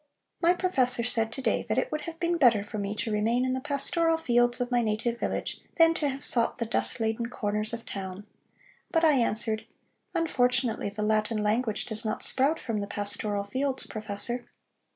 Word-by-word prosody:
My 350 +1 +4
professor 260 -10 +2
said 225 -2 +1
to 265 +3 -6
day - - +1
that - - 0
it - - 0
would 305 - -2
have 330 0 -11
been 345 0 0
better 235 -9 +4
for 210 +1 -6
me 200 +1 -3
to 220 - -3
remain 225 +4 +1
in 255 - 0
the 260 - -2
pastoral 325 +4 +1
fields 240 -5 +2
of 245 0 -2
my 245 -1 +3
native 230 +2 -1
village, - - -3
than 330 -1 +5
to 300 -3 -1
have 275 +1 -5
sought 235 - +5
the 230 - -2
dust 225 - +1
laden 225 +1 -1
corners 210 -2 -2
of 235 0 -6
town. 195 0 -6 0.6
But 330 -1 +2
I 315 - +6
answered: 220 -4 +2 0.5
'Unfortunately 250 -8 +1
the 210 +1 -4
Latin 215 0 +1
language 220 +1 0
does 220 -1 -4
not 215 -1 -3
sprout 280 +5 +2
from 225 -3 -3
the 200 - -4
pastoral 205 0 -2
fields, 265 +6 -2
professor.'" 215 +3 -5
235 Hz, 195 wpm, -28 LUFS, 215-265 Hz, 0.6 s, I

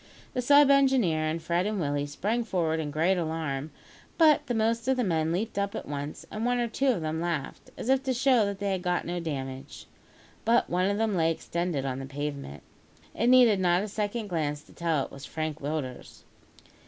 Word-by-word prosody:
The 250 - -1
sub 285 +2 +6
engineer 260 - +3
and 160 +2 -1
Fred 175 +3 0
and 210 -1 -2
Willie 145 -2 -1
sprang 210 +11 -1
forward 165 -7 0
in 155 -2 -3
great 165 +6 +1
alarm; 160 -3 -3 0.5
but 305 -3 +5
the 245 - -1
most 230 +2 0
of 265 -1 +2
the 250 - +1
men 160 -5 0
leaped 200 +4 -2
up 200 0 -2
at - - -6
once, 145 +1 -5
and 215 - -4
one 245 +1 +1
or 240 -1 0
two 265 +4 -1
of 240 -10 +2
them 155 +1 -2
laughed, 170 -5 -4
as - - -6
if 265 0 +3
to 260 - +1
show 255 -2 +4
that 200 -1 -3
they 200 0 -2
had 190 -1 -1
got 180 -1 -1
no 175 +1 -3
damage. 135 -4 -6 0.6
But 235 +2 +3
one 180 +2 +2
of 200 - 0
them 220 -2 0
lay 165 -2 +3
extended 170 -3 -2
on 130 -1 -2
the 135 - -6
pavement. 140 - -5 0.5
It 235 - 0
needed 245 -5 +6
not 180 0 +2
a - - -3
second 210 +2 -3
glance 150 -5 -2
to - - -19
tell 165 -4 0
that - - -2
it - - -29
was 140 +1 -9
Frank 155 -1 -4
Willders. 140 -3 -5
175 Hz, 215 wpm, -28 LUFS, 155-225 Hz, 0.6 s, sub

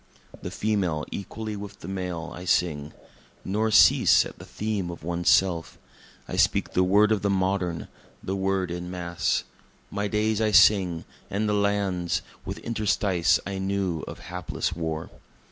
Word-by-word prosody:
The - - -5
Female 95 -8 -1
equally 110 +2 -5
with 100 0 -9
the - - -8
Male, 90 -3 -4
I 90 - -8
sing. 80 -4 0 0.5
Nor 105 +3 0
cease 110 - +6
at - - -10
the - - -10
theme 105 -4 -3
of 85 -3 -8
One's 85 +1 0
Self. 90 -4 +2 0.5
I - - -4
speak - - +2
the 90 - +3
word 105 +3 +4
of 110 - +2
the 100 - 0
modern, 95 -3 0 0.4
the 95 - -2
word 95 -2 0
En 90 0 -5
Masse. 90 -1 -1 0.5
My 100 0 -1
Days 110 +1 0
I 110 - +3
sing, 95 -4 +5 0.2
and 105 +2 -1
the 105 - +1
Lands 100 -4 0 0.2
with - - -5
interstice 105 -5 +2
I 100 -1 -4
knew 95 -4 -1
of - - -8
hapless 90 0 -3
War. 80 -1 -4
95 Hz, 160 wpm, -26 LUFS, 85-100 Hz, 0.5 s, cease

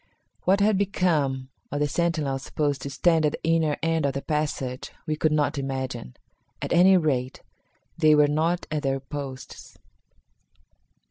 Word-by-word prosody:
What 195 +2 +3
had 205 -1 +3
become 155 -10 0 0.2
of 145 - -2
the 150 - +2
sentinels 155 -4 -1
supposed 145 -1 -2
to 140 - -5
stand 165 +3 +2
at 150 - +2
the - - -7
inner 160 -2 +2
end 165 -1 +1
of 135 - -2
the 140 - -4
passage 145 -4 -3
we 155 -2 -1
could 155 0 +1
not 150 -1 +1
imagine. 130 - -4 0.4
At - - -3
any 185 +2 +6
rate, 130 -6 -1 0.6
they 155 -2 +6
were 150 -1 +5
not 165 +4 0
at 155 -1 -1
their 135 -1 0
posts. 135 -1 -8
150 Hz, 155 wpm, -25 LUFS, 135-165 Hz, 0.6 s, any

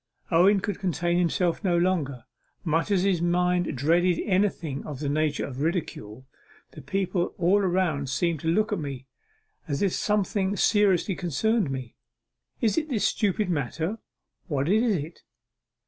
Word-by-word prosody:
Owen 190 +4 +5
could 205 -2 -3
contain 175 -1 0
himself 175 +1 0
no 175 -3 +2
longer, 160 -9 0 0.4
much 165 +2 0
as 190 -3 +2
his 190 -4 +1
mind 175 -1 +1
dreaded 170 +5 +2
anything 185 -8 0
of 145 -4 -7
the 145 - -3
nature 150 +1 0
of 135 -1 -6
ridicule. 145 - -3 0.5
'The 155 - -11
people 180 +4 -1
all 180 -5 +2
seem 155 +4 0
to 160 - -5
look 210 +6 +2
at 200 - -1
me, 135 -4 -6 0.6
as 145 +4 -1
if 195 - +1
something 205 -1 0
seriously 200 -3 +3
concerned 185 - 0
me; 130 -3 -5 0.7
is 230 +5 +2
it 310 0 -7
this 230 -7 0
stupid 205 -1 +1
matter, 160 0 -1 0.6
or 140 -3 0
what - - -2
is 220 +1 +3
it? 160 +1 -6
175 Hz, 150 wpm, -26 LUFS, 150-195 Hz, 0.7 s, Owen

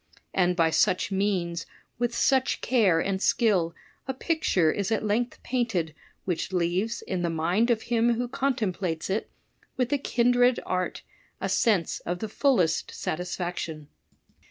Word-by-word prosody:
And 180 -1 +2
by 165 -2 +3
such 185 +2 +2
means, 185 -4 -1 0.3
with 240 -1 0
such 265 -1 +2
care 210 -10 +3
and 190 +2 -1
skill, 185 -10 +2 0.3
a 265 - -2
picture 260 - +1
Is 200 +4 -2
at 220 -1 0
length 235 +4 -1
painted 225 -11 -1 0.3
which 180 0 -2
leaves 185 +5 0
in 185 -2 -3
the 170 - 0
mind 175 +8 +1
of 230 -2 +1
him 235 0 +2
who 245 +1 -2
con 270 +2 0
templates 185 -5 -2
it 210 - -1 0.5
with 250 +2 0
a 285 - +2
kindred 245 -1 +3
art, 185 0 -2 0.4
a - - -2
sense 200 -8 +2
of 175 - -3
the 220 +3 -5
fullest 205 - +2
satis 180 +2 -4
faction. 165 -4 -5
195 Hz, 155 wpm, -27 LUFS, 175-240 Hz, 0.5 s, by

